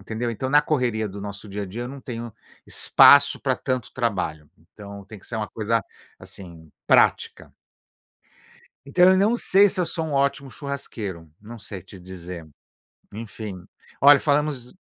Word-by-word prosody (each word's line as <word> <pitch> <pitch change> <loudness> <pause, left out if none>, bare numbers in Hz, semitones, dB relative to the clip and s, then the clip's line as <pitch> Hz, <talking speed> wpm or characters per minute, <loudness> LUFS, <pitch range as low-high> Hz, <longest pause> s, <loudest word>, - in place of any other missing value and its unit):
entendeu? 110 +4 -4
Então, 130 +4 -4
na 145 +1 +6
correria 120 -7 -1
do 100 +1 -9
nosso 100 +1 -8
dia 100 +1 -5
a - - -5
dia 115 +6 -6
eu 120 - -5
não 140 +1 -9
tenho 120 -3 -7 0.3
espaço - - +6
pra - - 0
tanto 130 -3 -3
trabalho, 90 - -3
então, 100 +4 -12
tem 105 0 -11
que - - -20
ser 115 - -5
uma 110 -1 -3
coisa, 115 +1 -1 0.4
assim, 85 -4 -11 0.2
prática. - - +2 1.3
Então, 180 +6 +4
eu - - +2
não 210 +5 +3
sei 200 -3 +4
se 190 -1 -4
eu - - 0
sou 160 -2 -3
um 150 - -5
ótimo 140 -1 0
churrasqueiro, 110 - -6
não 115 +2 -10
sei 100 -3 -9
te 95 - -14
dizer. 90 -2 -9 0.7
Enfim, 105 -4 -8 0.3
olha, 140 +1 +7
falamos 145 -4 -1
115 Hz, 165 wpm, -23 LUFS, 100-140 Hz, 1.3 s, olha